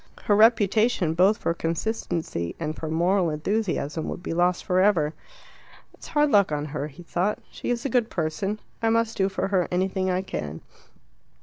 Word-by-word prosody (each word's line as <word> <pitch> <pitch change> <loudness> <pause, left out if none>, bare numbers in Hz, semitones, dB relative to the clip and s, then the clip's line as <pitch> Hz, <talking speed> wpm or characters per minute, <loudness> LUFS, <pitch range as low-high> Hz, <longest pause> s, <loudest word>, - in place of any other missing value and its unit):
Her 205 - +3
reputation, 215 -4 +4
both 190 +5 +4
for 170 - -1
consistency 165 - -3
and 155 -1 -3
for 160 - -5
moral 175 +3 +2
enthusiasm, 160 -2 -2
would 175 - -6
be - - -3
lost 175 +1 +1
for 180 0 +2
ever. 175 -6 +3 0.8
"It's - - -13
hard 295 -2 +2
luck 200 -6 +4
on 150 0 -1
her," 150 -1 -4
he 155 +4 -13
thought. 180 +5 -1
"She - - -6
is 240 +1 -1
a - - 0
good 235 -2 +1
person. 195 +6 -2 0.2
I 225 - +2
must 230 0 +1
do 195 0 +1
for 195 0 -2
her 185 -3 +1
anything 185 +1 0
I 185 +1 0
can." 75 - -5
185 Hz, 180 wpm, -25 LUFS, 165-210 Hz, 0.8 s, reputation